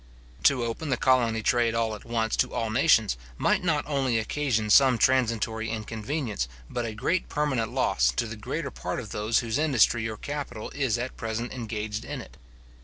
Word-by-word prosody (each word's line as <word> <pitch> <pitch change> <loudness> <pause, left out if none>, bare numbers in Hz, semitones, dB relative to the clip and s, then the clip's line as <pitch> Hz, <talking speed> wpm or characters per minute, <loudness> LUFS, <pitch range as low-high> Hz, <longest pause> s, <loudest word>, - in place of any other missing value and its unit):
To 130 -3 +4
open 115 +7 -4
the 130 - +1
colony 120 -4 +2
trade 120 -2 +2
all 115 -1 0
at 105 - -9
once 115 -1 0
to - - 0
all 115 -1 -1
nations, 110 - +3 0.2
might - - +2
not 155 -4 +1
only 135 -5 0
occasion 110 -2 0
some 130 0 +6
transitory 115 -2 +1
inconveniency, 110 - -3 0.2
but 120 - -2
a 110 - -6
great 165 +10 -1
permanent 130 -7 0
loss, - - +2
to 90 - 0
the 115 0 -6
greater 105 - -4
part - - -4
of - - -8
those 110 +3 +1
whose 115 +4 -1
industry 120 -6 +3
or 110 - -6
capital 140 -6 -5
is 130 -5 0
at 125 +2 -5
present 115 +1 -3
engaged 110 -3 -4
in - - -5
it. - - -11
115 Hz, 180 wpm, -27 LUFS, 110-130 Hz, 0.2 s, some